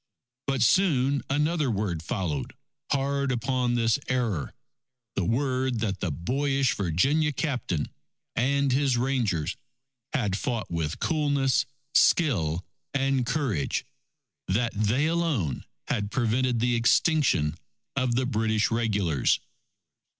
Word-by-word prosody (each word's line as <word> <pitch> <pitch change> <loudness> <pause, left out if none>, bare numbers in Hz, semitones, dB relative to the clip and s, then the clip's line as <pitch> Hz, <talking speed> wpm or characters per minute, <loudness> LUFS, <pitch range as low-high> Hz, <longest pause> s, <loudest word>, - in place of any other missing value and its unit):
But 135 -4 +1
soon 140 -4 +3
another 150 +1 +1
word 100 -7 -1
followed 80 - -3 0.4
hard 140 0 +1
upon 125 0 0
this 115 +2 +2
error 115 - -1 0.6
the 95 - -1
word 130 +3 0
that 100 -4 -1
the 95 - -1
boyish 135 - 0
Virginia 135 - +1
Captain 125 - -2 0.5
and 140 +2 +2
his 135 -1 +2
Rangers 120 - 0 0.6
had 105 -10 0
fought 115 -3 -3
with 80 -2 -2
coolness, 145 -5 +1 0.3
skill, 90 - +3 0.3
and 135 -2 +1
courage; 125 - -1 0.6
that 115 +4 0
they 110 +7 +1
alone 155 - 0 0.2
had 100 -3 -1
prevented 120 +1 +1
the 120 0 +2
extinction 115 - +3 0.4
of 130 -3 +1
the 130 +1 +1
British 110 -3 +1
Regulars. 105 - +1
125 Hz, 110 wpm, -27 LUFS, 100-140 Hz, 0.6 s, soon